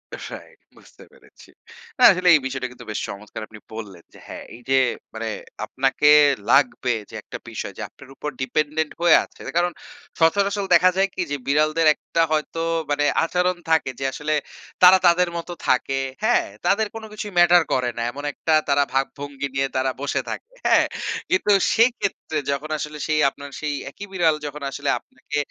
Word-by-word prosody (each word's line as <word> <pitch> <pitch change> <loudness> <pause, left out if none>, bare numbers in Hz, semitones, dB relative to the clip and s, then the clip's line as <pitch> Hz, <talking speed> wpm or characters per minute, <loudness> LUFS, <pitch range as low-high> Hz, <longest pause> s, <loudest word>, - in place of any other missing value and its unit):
Right, - - -10 0.2
বুঝতে - - -18
পেরেছি। - - -19 0.5
না - - +3
আসলে 180 -1 -1
এই - - +4
বিষয়টা 130 -1 -3
কিন্তু 120 -1 -13
বেশ - - -3
চমৎকার 105 +2 -8
আপনি 110 -1 -13
বললেন 100 -6 -8
যে, - - -15
হ্যাঁ, - - -8
এই 120 - -14
যে 135 - +4 0.4
মানে 110 0 -4 0.4
আপনাকে 135 +2 0 0.4
লাগবে 130 -2 +3 0.2
যে - - -11
একটা - - -8
বিষয়, - - -6
যে - - -6
আপনার 135 - -17
উপর 150 - -4
ডিপেন্ডেন্ট 155 +4 -1
হয়ে 170 -2 +6
আছে। - - -16 0.2
কারণ 175 0 +2 0.5
সচরাচল 200 +4 +2
দেখা 185 - +6
যায় 195 0 +3
কি 185 - -3
যে, - - 0
বিড়ালদের 155 +3 +2
একটা 165 - -2
হয়তো 155 +1 -1 0.3
মানে 145 0 +1 0.2
আচরণ 180 +2 +1
থাকে 160 -4 +2
যে, 135 - -3
আসলে, 155 +1 -2 0.5
তারা 185 +1 +9
তাদের 175 +1 +4
মত 170 - -6 0.2
থাকে। 130 +1 +1 0.3
হ্যাঁ! 240 +2 +3 0.2
তাদের 205 +4 +2
কোন 225 - -7
কিছুই 210 -1 -6
ম্যাটার 175 -1 +6
করে 125 -1 +1
না। - - -2
এমন 145 +2 -8
একটা 160 - -1 0.2
তারা 140 0 +4
ভাবভঙ্গি 140 +1 -3
নিয়ে 135 0 +1
তারা 130 0 +1
বসে 140 - -1
থাকে। 460 - -6 0.2
হ্যাঁ, - - +5 0.4
কিন্তু 190 +2 +2 0.2
সেইক্ষেত্রে 225 -8 +1
যখন 145 +3 -3
আসলে 150 0 -6
সেই, 155 -1 +1
আপনার 140 +1 -11
সেই 150 -1 -2 0.2
একি 200 - -11
বিড়াল, 165 -4 +2
যখন 145 0 -6
আসলে - - -3
আপনাকে, 150 - -7
150 Hz, 175 wpm, -22 LUFS, 135-180 Hz, 0.5 s, তারা